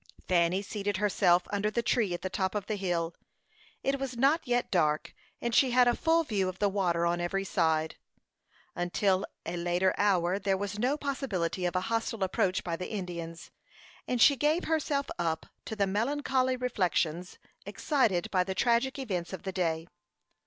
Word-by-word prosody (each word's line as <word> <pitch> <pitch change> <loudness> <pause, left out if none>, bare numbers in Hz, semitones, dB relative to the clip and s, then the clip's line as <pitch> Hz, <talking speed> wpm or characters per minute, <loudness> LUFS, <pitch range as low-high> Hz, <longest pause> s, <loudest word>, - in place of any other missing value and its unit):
Fanny 180 +2 +2
seated 205 -1 -3
herself 180 -3 +3
under 205 +1 0
the 235 +2 -1
tree 225 -4 +1
at 175 - -4
the - - 0
top 190 +1 -1
of 205 -2 -2
the 215 - -2
hill. 175 -4 -1 0.7
It 275 0 0
was 265 -3 -4
not 280 +6 +3
yet 245 0 0
dark, 155 -4 +1 0.3
and 235 -1 -2
she 260 +3 +5
had 250 0 +5
a 240 - +3
full 330 0 +2
view 200 -9 0
of 185 - -7
the 205 0 +2
water 175 -4 +1
on 175 0 0
every 195 +3 -1
side. 160 -4 0 0.8
Until 185 +2 +1 0.2
a 175 - -3
later 175 +2 +1
hour 190 -2 +2
there 195 -1 +1
was 205 +1 -4
no 260 +6 +1
possibility 200 - -2
of 175 - -4
a 185 - +2
hostile 225 0 -1
approach 185 0 0
by 170 -2 -2
the 180 +2 -6
Indians, 170 -5 -6 0.6
and 250 - -1
she 280 +4 +7
gave 300 +6 +1
herself 295 -3 0
up 165 -2 -1 0.2
to 220 - -5
the 200 -2 +2
melancholy 255 +5 0
reflections 180 -7 -1 0.3
excited 225 - 0
by 185 -2 +3
the 190 +1 -4
tragic 240 +4 +2
events 190 -10 -3
of 190 - -6
the 190 - -3
day. 165 -3 -1
195 Hz, 180 wpm, -29 LUFS, 175-240 Hz, 0.8 s, she